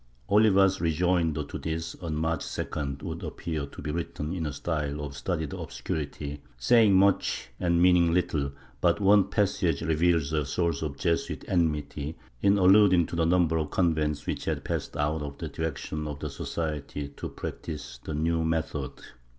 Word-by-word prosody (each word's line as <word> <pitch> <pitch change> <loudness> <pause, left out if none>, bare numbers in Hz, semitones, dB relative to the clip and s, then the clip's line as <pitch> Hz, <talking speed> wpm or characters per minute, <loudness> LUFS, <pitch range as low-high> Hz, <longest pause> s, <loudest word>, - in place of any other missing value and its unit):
Oliva's 100 -3 +5
rejoinder 85 -2 +1
to - - -7
this, 80 0 -3
on 80 -3 -3
March 80 0 0
2d, 70 -2 -4
would - - -5
appear 75 -4 -4
to - - -10
be 75 - -2
written 80 -1 -3
in 85 -4 -2
a - - -3
style 75 0 -2
of 70 -1 -5
studied 80 -2 -2
obscurity, 70 +3 -5 0.2
saying 105 - +5
much 95 -9 +2
and 85 -1 +2
meaning 90 -1 +5
little, 80 -5 0 0.3
but 85 +1 +3
one 100 0 +5
passage 90 -6 +1
reveals 80 -1 +2
a 75 -1 +2
source 85 +2 -1
of 75 -3 -3
Jesuit 85 +1 -1
enmity, 75 -3 -1 0.2
in 100 +1 +4
alluding 95 -2 +6
to - - -6
the 85 -1 +2
number 85 -2 +3
of 75 -2 -2
convents 75 -4 +1
which - - -3
had - - -1
passed - - -3
out 75 +1 0
of 70 -1 -6
the - - -5
direction 75 -1 -4
of 75 -1 -5
the 75 0 -5
Society 75 -2 -4
to - - -7
practise 75 -6 -6
the 80 - -4
new 80 +2 +1
method. 80 -4 -1
80 Hz, 165 wpm, -28 LUFS, 75-85 Hz, 0.3 s, alluding